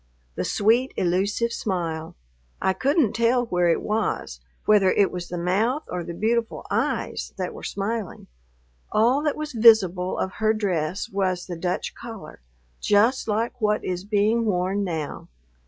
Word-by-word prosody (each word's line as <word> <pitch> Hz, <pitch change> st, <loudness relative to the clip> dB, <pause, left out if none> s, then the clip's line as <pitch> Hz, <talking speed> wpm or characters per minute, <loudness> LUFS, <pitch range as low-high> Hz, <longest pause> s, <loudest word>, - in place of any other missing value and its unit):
The -, -, -3 dB
sweet, 235 Hz, +6 st, +2 dB
elusive 200 Hz, +6 st, 0 dB
smile, 165 Hz, -5 st, -3 dB, 0.4 s
I 190 Hz, -, +1 dB
couldn't 270 Hz, -, +2 dB
tell 240 Hz, +2 st, +2 dB
where 180 Hz, -5 st, +1 dB
it 165 Hz, -, +1 dB
was, 210 Hz, -, -2 dB, 0.3 s
whether 205 Hz, -3 st, +5 dB
it 200 Hz, 0 st, +3 dB
was 175 Hz, -1 st, -5 dB
the 175 Hz, -, -5 dB
mouth 210 Hz, -, 0 dB
or 180 Hz, -1 st, -3 dB
the 170 Hz, -, -6 dB
beautiful 230 Hz, +3 st, -1 dB
eyes -, -, -2 dB
that -, -, -3 dB
were -, -, -10 dB
smiling. 205 Hz, 0 st, -4 dB, 0.7 s
All 240 Hz, +6 st, +3 dB
that 300 Hz, -1 st, 0 dB
was 305 Hz, -1 st, -5 dB
visible 195 Hz, -6 st, +4 dB
of 190 Hz, -, -1 dB
her 220 Hz, 0 st, +3 dB
dress 185 Hz, -4 st, -1 dB
was 185 Hz, -2 st, -1 dB
the 175 Hz, -, -5 dB
Dutch 175 Hz, +2 st, -2 dB
collar, 215 Hz, -, -10 dB, 0.4 s
just 220 Hz, +6 st, +3 dB
like 230 Hz, +3 st, -1 dB
what 210 Hz, 0 st, +1 dB
is 180 Hz, 0 st, -3 dB
being 215 Hz, +3 st, +2 dB
worn 195 Hz, -1 st, 0 dB
now. 160 Hz, -6 st, -4 dB
205 Hz, 155 wpm, -24 LUFS, 180-230 Hz, 0.7 s, whether